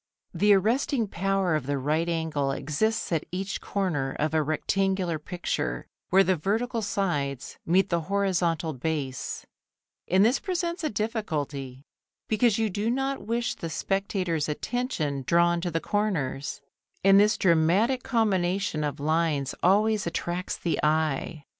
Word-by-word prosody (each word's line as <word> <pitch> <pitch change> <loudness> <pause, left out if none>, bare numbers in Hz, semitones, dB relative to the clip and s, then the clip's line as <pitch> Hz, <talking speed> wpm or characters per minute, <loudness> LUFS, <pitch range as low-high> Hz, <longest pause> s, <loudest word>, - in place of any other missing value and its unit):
The 205 0 +5
arresting 230 +3 +1
power 195 -1 0
of 150 -4 -1
the 145 0 0
right 155 +5 0
angle 160 -4 -1
exists 185 +13 -1
at 165 -3 +1
each 195 +3 -3
corner 160 -9 -1
of 155 +1 -1
a 160 - +3
rectangular 180 +2 0
picture, 150 - -3 0.2
where 190 +2 +6
the 190 -1 +2
vertical 225 +8 -1
sides 160 - -2
meet 185 +3 +3
the 170 -1 +1
horizontal 175 -5 +1
base, 135 -1 -3 0.6
and 190 +3 +4
this 245 +4 +3
presents 345 -2 -2
a 310 - +1
difficulty, 150 - -3 0.4
because 220 0 +3
you 225 -1 +1
do 205 +3 -1
not 270 0 -2
wish 235 +1 0
the 165 - -6
spectator's 185 -4 -1
attention 150 - -2
drawn 170 0 +3
to 175 - -1
the 165 -1 -1
corners, 180 -10 -2 0.4
and 195 +1 +7
this 210 +1 +4
dramatic 185 +9 +3
combination 195 - 0
of 145 -1 -3
lines 155 -2 0
always 210 +2 +3
attracts 175 +2 -3
the 170 - -1
eye. 155 -1 0
180 Hz, 140 wpm, -27 LUFS, 155-205 Hz, 0.6 s, and